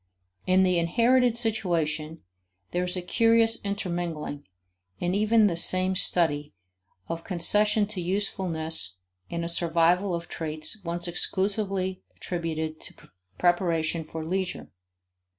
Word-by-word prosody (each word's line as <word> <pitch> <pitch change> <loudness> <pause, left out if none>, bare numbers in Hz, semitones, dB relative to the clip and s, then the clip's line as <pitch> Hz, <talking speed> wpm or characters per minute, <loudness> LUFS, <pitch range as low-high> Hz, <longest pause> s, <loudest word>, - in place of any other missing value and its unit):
In 185 +1 +4
the 180 -2 +2
inherited 235 +7 +2
situation, 165 -9 -1 0.5
there 180 - -1
is 180 +1 -1
a 180 - -4
curious 230 +3 +3
intermingling, 175 -7 -4 0.5
in 175 - -2
even 215 +2 +3
the 185 -5 +1
same 185 +2 +6
study, 150 - +2 0.5
of 165 0 -5
concession 210 +4 +2
to 205 -4 -5
usefulness 165 - -1 0.3
and 170 0 -3
a - - -2
survival 170 +2 +2
of 170 0 -6
traits 155 +5 -2
once 170 0 -3
exclusively 190 +1 -2
attributed 160 -3 -4
to - - -9 0.4
preparation 170 -2 +1
for 160 +1 -7
leisure. 185 +2 -3
175 Hz, 115 wpm, -26 LUFS, 165-200 Hz, 0.5 s, same